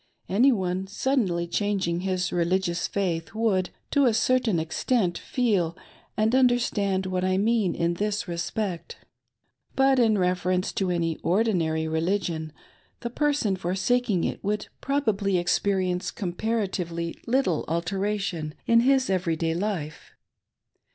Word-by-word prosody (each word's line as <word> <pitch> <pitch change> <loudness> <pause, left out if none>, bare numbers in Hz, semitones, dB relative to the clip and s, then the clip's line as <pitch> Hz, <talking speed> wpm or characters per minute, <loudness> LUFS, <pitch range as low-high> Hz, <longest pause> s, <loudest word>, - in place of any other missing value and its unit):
Any 245 +8 +4
one 190 -3 -1
suddenly 200 -6 0
changing 185 -2 -1
his 185 -1 -1
religious 175 0 0
faith 175 -2 -2
would, 205 -5 +1 0.2
to 285 -1 +4
a 225 - +2
certain 230 -5 +2
extent, 175 +4 0
feel 195 -9 0 0.4
and 220 +2 +2
understand 235 -7 +2
what 185 -1 -1
I 185 0 +1
mean 215 -2 +1
in 170 0 0
this 205 +3 -2
respect. 175 +1 -3 0.8
But 270 -1 +4
in 220 -3 +4
reference 180 0 0
to 190 -2 -1
any 165 -2 0
ordinary 170 -5 +1
religion, 160 -1 -1 0.5
the 235 - -4
person 285 -8 +1
forsaking 190 +3 0
it - - -3
would 210 +1 -2
probably 215 -9 +1
experience 180 0 0
comparatively 180 -4 -2
little 240 - +1
alteration 175 -1 -2
in 230 0 +5
his 265 +2 +3
every 180 -3 0
day 165 0 -1
hfe. 175 -4 -2
190 Hz, 125 wpm, -26 LUFS, 175-220 Hz, 0.8 s, in